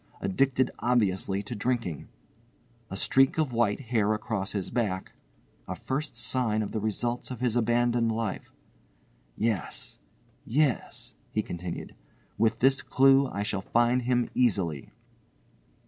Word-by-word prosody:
addicted 130 Hz, +6 st, +1 dB
obviously 100 Hz, -5 st, +1 dB
to 105 Hz, -, -5 dB
drinking), 115 Hz, -, -2 dB, 0.8 s
a 95 Hz, -, -4 dB
streak 135 Hz, +8 st, +3 dB
of 150 Hz, -6 st, 0 dB
white 115 Hz, -3 st, +2 dB
hair 110 Hz, -4 st, +1 dB
across 105 Hz, -2 st, -3 dB
his 100 Hz, -3 st, -3 dB
back 105 Hz, -6 st, -1 dB, 0.6 s
(a -, -, -3 dB
first 140 Hz, +1 st, -3 dB
sign 115 Hz, -2 st, 0 dB
of 105 Hz, -, -5 dB
the 110 Hz, -, -2 dB
results 120 Hz, +3 st, -2 dB
of 125 Hz, -, -6 dB
his 125 Hz, -2 st, 0 dB
abandoned 120 Hz, 0 st, +2 dB
life)—yes, 105 Hz, -, -5 dB, 0.4 s
yes," 135 Hz, -, 0 dB, 0.2 s
he -, -, -1 dB
continued, 85 Hz, 0 st, -6 dB, 0.4 s
"with 115 Hz, +1 st, +2 dB
this 135 Hz, +1 st, +4 dB
clue 135 Hz, +1 st, +5 dB
I 100 Hz, -4 st, -3 dB
shall 100 Hz, -2 st, -2 dB
find 120 Hz, +5 st, +2 dB
him 125 Hz, 0 st, +1 dB
easily." 95 Hz, -, +1 dB
115 Hz, 125 wpm, -28 LUFS, 100-125 Hz, 0.8 s, clue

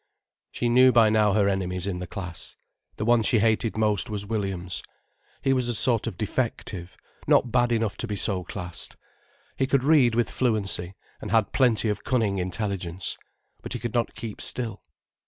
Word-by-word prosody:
She 120 Hz, -, -1 dB
knew 130 Hz, +2 st, +6 dB
by 115 Hz, -2 st, +5 dB
now 105 Hz, -2 st, +3 dB
her 100 Hz, -1 st, +3 dB
enemies 90 Hz, -2 st, -1 dB
in 95 Hz, -3 st, -3 dB
the 90 Hz, -, -5 dB
class. 90 Hz, -4 st, -7 dB, 0.4 s
The -, -, -3 dB
one 120 Hz, 0 st, +4 dB
she 115 Hz, -, +2 dB
hated 110 Hz, +1 st, +1 dB
most 110 Hz, +1 st, +2 dB
was 105 Hz, -1 st, -3 dB
Williams. 95 Hz, -4 st, -3 dB, 0.6 s
He 135 Hz, -, +3 dB
was 130 Hz, -2 st, 0 dB
a 120 Hz, -, -1 dB
sort 115 Hz, +2 st, +1 dB
of 105 Hz, -7 st, -5 dB
defective, 105 Hz, -5 st, -3 dB, 0.3 s
not 120 Hz, -, +4 dB
bad 120 Hz, -1 st, +3 dB
enough 115 Hz, -3 st, 0 dB
to 120 Hz, -, -3 dB
be 105 Hz, -, -3 dB
so 95 Hz, -2 st, 0 dB
classed. 90 Hz, -1 st, -6 dB, 0.6 s
He 135 Hz, -, +1 dB
could 135 Hz, -1 st, +2 dB
read 135 Hz, -6 st, +5 dB
with 120 Hz, 0 st, +1 dB
fluency, 100 Hz, -7 st, -1 dB, 0.3 s
and -, -, -5 dB
had 110 Hz, -2 st, +2 dB
plenty 120 Hz, -4 st, +3 dB
of 105 Hz, -, -2 dB
cunning 110 Hz, -7 st, +1 dB
intelligence. 90 Hz, -1 st, -3 dB, 0.5 s
But -, -, -6 dB
he -, -, -3 dB
could 120 Hz, -, -4 dB
not 120 Hz, -1 st, 0 dB
keep 110 Hz, -3 st, -7 dB
still. 120 Hz, -3 st, -4 dB
110 Hz, 180 wpm, -26 LUFS, 95-120 Hz, 0.6 s, knew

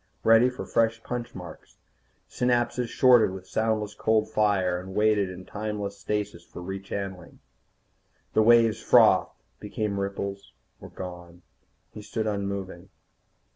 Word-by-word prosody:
Ready 115 Hz, +2 st, +6 dB
for 125 Hz, -, -7 dB
fresh 115 Hz, 0 st, 0 dB
punch 120 Hz, -1 st, -5 dB
marks. 90 Hz, -3 st, -11 dB, 0.5 s
Synapses 125 Hz, 0 st, 0 dB
shorted 125 Hz, -3 st, +5 dB
with 95 Hz, 0 st, -8 dB
soundless 110 Hz, 0 st, -1 dB
cold 110 Hz, 0 st, +1 dB
fire, 100 Hz, -5 st, +1 dB
and 95 Hz, +1 st, -9 dB
waited 105 Hz, -2 st, +2 dB
in 90 Hz, 0 st, -9 dB
timeless 105 Hz, -1 st, -4 dB
stasis 105 Hz, -3 st, -3 dB
for -, -, -12 dB
rechannelling. 95 Hz, -1 st, -6 dB, 1.0 s
The -, -, +4 dB
waves 115 Hz, 0 st, +4 dB
frothed, -, -, +5 dB, 0.3 s
became 105 Hz, -1 st, -3 dB
ripples, 100 Hz, 0 st, -5 dB, 0.3 s
were -, -, -11 dB
gone. 90 Hz, -1 st, -9 dB, 0.5 s
He 105 Hz, -, -8 dB
stood 110 Hz, +1 st, -4 dB
unmoving. 100 Hz, -3 st, -4 dB
105 Hz, 125 wpm, -26 LUFS, 95-110 Hz, 1.0 s, Ready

